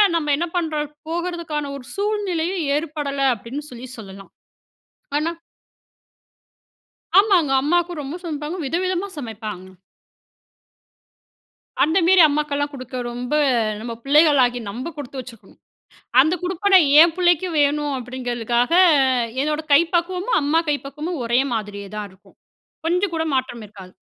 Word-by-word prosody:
நம்ம 300 -3 0
என்ன 345 - -1
பண்றோம் 305 -3 -2 0.2
போகறதுக்கான 335 -4 -3
ஒரு 250 - -12
சூழ்நிலையும் 385 -4 -1
ஏற்படல 290 -3 -4
அப்படின்னு 235 +7 -7
சொல்லி 245 +1 -9
சொல்லலாம். 195 -2 -11 0.9
ஆனா 320 +3 0 1.9
ஆமாங்க. 370 -9 +3
அம்மாக்கு 345 +2 0
ரொம்ப 285 +4 -6
சமைப்பாங்க 305 +1 -4
விதவிதமா 365 +5 -1
சமைப்பாங்க. 215 -7 -7 2.1
அந்த 320 +4 +2
மேரி 370 -1 +6
அம்மாக்கெல்லாம் 290 0 -1
குடுக்க, 255 -1 -8 0.2
ரொம்ப 245 +4 -5 0.5
நம்ம 230 +1 -5
பிள்ளைகளாகிய 275 -5 +4
நம்ப 245 +10 -5
கொடுத்து 275 -2 -7
வச்சிருக்கணும். 240 -3 -12 0.6
அந்த 315 +6 +3
குடுப்பனை 375 +2 +3 0.2
என் 335 -1 +3
பிள்ளைக்கு 355 0 +2
வேணும் 290 0 +1
அப்படிங்கிறதுக்காக, 245 +1 -2 0.7
என்னோட 300 +1 -1
கை 285 - +8
பக்குவமும் 365 +6 +1
அம்மா 310 +3 +2
கை 290 - +2
பக்குவமும் 300 +2 -5
ஒரே 240 +2 +2
மாதிரியே 205 -2 -5
தான் 210 -1 -5
இருக்கும். 195 +1 -23 0.5
கொஞ்சம் 360 +2 0
கூட 320 0 -1
மாற்றம் 245 -3 -2
இருக்காது. 190 -3 -14
295 Hz, 115 wpm, -21 LUFS, 245-340 Hz, 2.1 s, கை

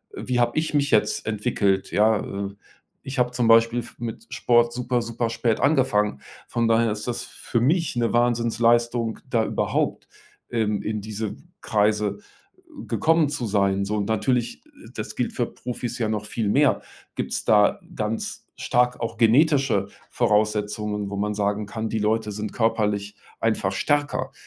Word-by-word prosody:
äh: - - -6
„Wie 125 -1 +1
habe 120 +2 +1
ich 155 0 0
mich 145 0 +1
jetzt 105 0 +2
entwickelt?“, 105 -3 0
ja? 110 0 +3 0.3
Äh, 100 - -11 0.5
ich 135 0 -3
habe 125 0 +3
zum 125 -2 0
Beispiel 115 +1 +5
f 120 - -9
mit 120 - -6
Sport 120 -1 +3
super 125 0 -1
super 115 0 -2
spät 115 0 0
angefangen, 125 - +2 0.3
von 115 -1 0
daher 115 0 +3
ist 105 +2 -5
das 120 - -2
für 120 - -3
mich 155 +5 +1
'ne 120 -1 0
Wahnsinnsleistung, 120 -1 +2
da 115 -3 +2
überhaupt, - - -1 0.4
ähm, 110 -3 0
in 110 -1 -3
diese 110 0 -4 0.3
Kreise 105 -1 +1 0.7
gekommen 160 -2 +2
zu 145 -4 -3
sein, 100 -2 +1
so. 105 +2 -2
Und 100 - -1
natürlich, 120 +2 0
äh, - - -24 0.3
das - - -5
gilt - - -2
für - - 0
Profis 120 0 -6
ja 110 - 0
noch 105 -1 -2
viel 105 -1 -2
mehr 140 +4 +3 0.3
gibt's - - -3
da 105 -1 +4 0.2
ganz 110 +1 -4
stark 125 0 +1
auch 115 0 -3
genetische 125 -3 +3 0.2
Voraussetzungen, 105 -2 0
wo - - -3
man 105 +1 -1
sagen 105 +1 -1
kann, 110 +1 -4
die 110 - -1
Leute 110 0 0
sind 105 +1 -5
körperlich 105 -3 0 0.2
einfach 110 -4 0
stärker. 135 +2 0
115 Hz, 160 wpm, -24 LUFS, 105-120 Hz, 0.7 s, Beispiel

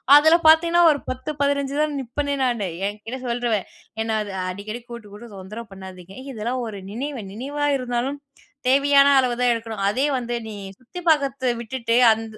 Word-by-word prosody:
அதில 315 +3 +7
பாத்தீங்கன்னா 335 +2 +6
ஒரு 285 - -1
10 255 +4 -4
15 280 -1 0
தான் 305 -1 0
நிப்பனே 285 +3 -2
நானு 235 -6 0 0.2
என்கிட்ட 215 +5 -6
சொல்ருவன் 235 -4 0 0.4
என்ன 220 -1 0
அது 205 - -8 0.2
"அடிக்கடி 215 +5 -6
கூட்டு 235 -3 -9
கூட்டு 225 +3 -10
தொந்தர 205 +5 -8
பண்ணாதீங்க. 190 -1 -11 0.2
இதெல்லாம் 240 +2 -3
ஒரு 205 -2 -7
நினைவு, 265 +3 -4
நினைவா 285 +6 -3
இருந்தாலும் 250 +2 -2 0.5
தேவையான 280 +1 +5
அளவுதான் 250 -1 +2
எடுக்கணும். 225 -3 -4
அதே 260 +7 +1
வந்து 240 -1 -3
நீ 215 - -7 0.2
சுத்தி 260 +9 -9
பாக்கர்த்த 275 -4 +2
விட்டுட்டு, 235 0 -2 0.2
அந் 220 +1 0
245 Hz, 155 wpm, -23 LUFS, 220-280 Hz, 0.5 s, அதில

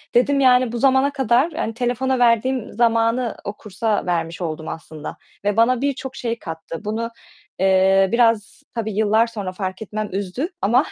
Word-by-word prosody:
dedim 275 +3 +4
yani 250 -2 +4
bu 240 - -3
zamana 270 +2 +3
kadar, 265 +4 +2
yani 305 -8 -3
telefona 250 +2 0
verdiğim 240 +1 +2
zamanı 230 +1 +1
o 200 - -4
kursa 210 0 -2
vermiş 170 0 -2
oldum 160 -1 -4
aslında 160 -2 -7 0.3
ve 205 +1 +1
bana 235 +2 +3
birçok 270 -1 -2
şey 235 -3 -3
kattı. 165 +3 -7
Bunu, 230 +2 -2 0.5
eee, 190 0 +4
biraz 230 +2 +1
tabii 220 -2 -2
yıllar 220 +2 +3
sonra 205 -5 -5
fark 185 0 -5
etmem 215 0 -4
üzdü 200 - -3
ama 245 +8 +3
230 Hz, 160 wpm, -21 LUFS, 195-250 Hz, 0.5 s, dedim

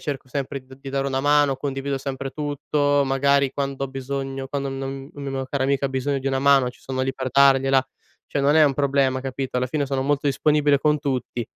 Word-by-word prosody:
cerco 140 -3 -5
sempre 140 0 -4
d 130 0 -14
di 135 0 -8
dare 135 0 -1
una 135 -1 -1
mano, 145 -1 +3
condivido 135 0 -3
sempre 135 0 -5
tutto, 145 0 0
magari 140 0 +2
quando 140 -1 -3
ho - - -5
bisogno, 135 0 -4
quando 140 -1 -3
non 135 +1 -5
una 140 -1 -5
mia 135 -1 -3
cara 140 -1 -1
amica 140 0 +1
bisogno 135 +1 -1
di 135 - -7
una 135 -1 +1
mano 135 -2 +4
ci 125 - -21
sono 130 -1 -4
lì 130 0 0
per 130 -1 -4
dargliela. 135 -1 +5 0.4
Cioè, 145 - -2
non 140 +2 +3
è 155 - +6
un 140 -2 +2
problema, 135 -2 +1
capito, 135 -1 -4
alla 125 0 +1
fine 145 +2 -1
sono 135 -1 -1
molto 145 +1 0
disponibile 145 0 +3
con 150 +1 +2
tutti, 125 -4 -3
135 Hz, 215 wpm, -23 LUFS, 135-140 Hz, 0.4 s, è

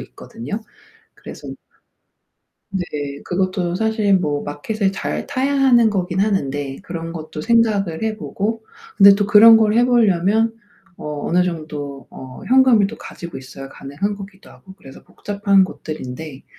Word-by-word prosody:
있거든요. 145 - -8 0.5
그래서 - - -11 1.2
네. 190 -2 -2 0.4
그것도 185 -1 -1
사실 220 -1 +1
뭐 145 -5 -2
마켓을 195 +8 -2
잘 - - -4
타야 275 +1 -1
하는 245 -5 +4
거긴 185 -2 -2
하는데 145 -9 -1
그런 165 -2 -6
것도 155 -1 -7
생각을 215 -6 +1
해 220 -1 -2
보고 220 +2 -4 0.3
근데 200 -1 +9
또 205 0 0
그런 225 +2 +8
걸 215 -1 +3
해 240 +1 +4
보려면 225 -1 +2 0.4
어 150 -1 -5
어느 180 +2 +3
정도 150 -6 -6
어 130 -1 -11
현금을 255 -5 +5
또 230 +3 -9
가지고 170 0 -9
있어야 135 +1 -10
가능한 145 +10 -4
거기도 195 -1 -12
하고 190 - -15
그래서 135 - -14
복잡한 200 -1 +1
것들인데 155 -4 -7
195 Hz, 295 characters per minute, -19 LUFS, 155-220 Hz, 1.2 s, 근데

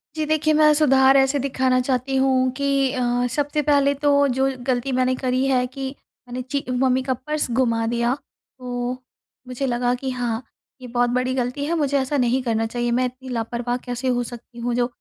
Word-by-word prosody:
जी, 310 -1 -1
देखिए, 310 0 +2
मैं 305 0 +5
सुधार 270 -3 +5
ऐसे 270 +1 +3
दिखाना 260 -1 +1
चाहती 255 +1 -1
हूँ 260 -1 +3
कि 275 -1 +1
अ, 245 -1 0
सबसे 290 +1 0
पहले 285 -1 +3
तो 285 0 +3
जो 265 +1 +1 0.2
गलती 255 +1 0
मैंने 255 0 +1
करी 255 0 0
है 255 -2 +2
कि 265 +1 -5 0.4
मैंने 245 +1 -5
चि 280 -1 -1
मम्मी 255 +1 +2
का 260 0 0
पर्स 300 +4 -3
गुमा 230 -2 +1
दिया। 235 +1 +1
तो 250 -3 -7 0.5
मुझे 255 +2 -3
लगा 245 -1 0
कि 265 +1 -4
हाँ, 245 -1 -2 0.4
ये 250 - -8
बहुत 245 0 +1
बड़ी 255 +1 0
गलती 255 +3 -2
है, 335 +3 0
मुझे 285 -3 +1
ऐसा 270 +2 -1
नहीं 250 0 +2
करना 225 -2 0
चाहिए। 240 +1 -2
मैं 250 +2 +2
इतनी 255 +1 -7
लापरवाह 240 +1 -2
कैसे 245 +1 -3
हो 245 -1 +1
सकती 240 0 -10
हूँ 240 +1 -2
जो 240 0 +1
255 Hz, 195 wpm, -22 LUFS, 245-275 Hz, 0.5 s, मैं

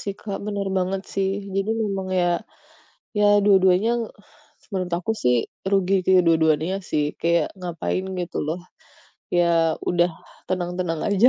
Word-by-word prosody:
sih, 200 - -3
Kak, 200 -2 -4
benar 200 -1 -2
banget 190 +1 -1
sih. 195 -1 +1 0.2
Jadi 195 +2 0
memang 195 -2 -3
ya, 175 - +2 0.9
ya 210 - +4 0.2
dua-duanya, 190 +2 +5 0.8
menurut 185 -2 -2
aku 180 +6 -2
sih 125 0 +4 0.4
rugi 195 -1 +2
ke - - +3 0.2
dua-duanya 160 +3 +3
sih. 150 -1 +1 0.2
Kayak 170 -2 +2
ngapain 180 +1 -3
gitu 175 0 -4
loh, 165 +4 -2 0.8
ya 170 -2 +3
udah 175 0 +3 0.4
tenang-tenang 180 -2 -2
aja. 205 +5 +5
185 Hz, 135 wpm, -23 LUFS, 170-195 Hz, 0.9 s, dua-duanya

